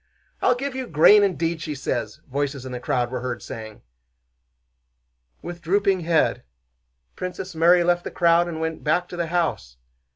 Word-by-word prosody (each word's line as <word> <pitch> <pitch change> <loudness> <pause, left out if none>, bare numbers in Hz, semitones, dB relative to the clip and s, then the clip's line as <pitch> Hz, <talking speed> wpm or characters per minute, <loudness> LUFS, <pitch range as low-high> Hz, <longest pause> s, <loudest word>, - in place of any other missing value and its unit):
'I'll 250 - +3
give 275 +2 -4
you 260 -1 -4
grain, 165 +7 +6
indeed!' 170 -4 -1
she 155 -2 -4
says," 130 -2 -4
voices 140 -1 -3
in 130 - -6
the 125 - -5
crowd 120 -1 -1
were 130 - -3
heard 125 -1 -4
saying. 110 -2 -9 1.6
With 175 0 -7
drooping 195 +2 +2
head 165 -2 +1 0.7
Princess 185 +1 -6
Mary 170 +2 +4
left 175 0 +1
the - - -5
crowd 170 0 +3
and 165 -2 -5
went 160 0 -4
back 155 +4 +1
to - - -7
the 170 -1 -2
house. 160 - -2
165 Hz, 165 wpm, -23 LUFS, 140-180 Hz, 1.6 s, grain